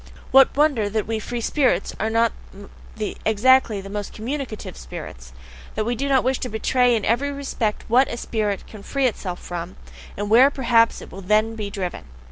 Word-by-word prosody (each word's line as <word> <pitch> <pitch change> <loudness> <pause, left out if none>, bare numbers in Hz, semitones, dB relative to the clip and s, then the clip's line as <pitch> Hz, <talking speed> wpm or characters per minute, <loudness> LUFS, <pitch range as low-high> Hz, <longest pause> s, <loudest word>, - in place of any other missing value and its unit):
What 270 +1 +6
wonder 280 -9 +2
that 215 0 -1
we 225 0 -2
"free 240 +2 -4
spirits" 265 +2 +1
are 220 - 0
not 230 +1 +2 0.9
exactly 220 -1 +3
the 195 - -10
most 205 -1 -5
communicative 240 - -5
spirits? 60 +1 -9 0.4
that 215 - -1
we 240 - 0
do 275 +4 -2
not 265 -2 +3
wish 260 0 0
to 250 - -4
betray 245 +3 +2
in 215 - -1
every 275 +6 +1
respect 265 -6 -3
WHAT 255 +4 +4
a 235 - -5
spirit 210 -4 -2
can 215 - -12
free 275 +6 -1
itself 190 -7 -2
from, 175 +1 -6 0.4
and 205 +1 -3
WHERE 250 +5 +7
perhaps 235 -4 +2
it - - -13
will 195 - -8
then 215 +4 +2
be 215 -2 -5
driven? 185 - -5
225 Hz, 185 wpm, -22 LUFS, 205-260 Hz, 0.9 s, WHERE